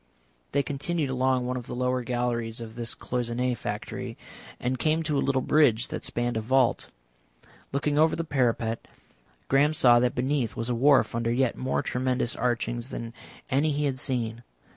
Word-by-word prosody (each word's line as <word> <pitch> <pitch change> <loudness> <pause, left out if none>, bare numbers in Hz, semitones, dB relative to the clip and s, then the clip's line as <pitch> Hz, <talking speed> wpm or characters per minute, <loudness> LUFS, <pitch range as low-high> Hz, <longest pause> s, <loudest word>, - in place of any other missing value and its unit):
They 140 0 +2
continued 145 +1 -1
along 130 -1 +1
one 125 +1 -2
of 125 - -7
the - - -5
lower 125 0 0
galleries 120 -1 -2
of 115 -1 -7
this 115 0 -3
cloisonné 125 0 -1
factory, 105 -2 -5 0.4
and 125 0 -1
came 155 +5 +1
to 150 -2 -1
a 140 - +2
little 135 -2 +1
bridge 130 -7 +3
that - - -5
spanned 120 -1 -1
a - - 0
vault. 130 +2 +2 0.8
Looking 145 +1 0
over 160 +1 +4
the 165 - -2
parapet, 120 -6 0 0.6
Graham 145 +3 +3
saw 120 -4 +6
that 125 +2 +1
beneath 130 -2 0
was 115 +2 -3
a - - +1
wharf 135 +3 +4
under 115 0 0
yet 125 0 +1
more 130 - -1
tremendous 125 -1 0
archings 120 0 -1
than 115 -3 -6 0.4
any 145 +4 +2
he 145 +1 0
had 135 -2 -1
seen. 120 -4 -2
125 Hz, 175 wpm, -27 LUFS, 120-140 Hz, 0.8 s, saw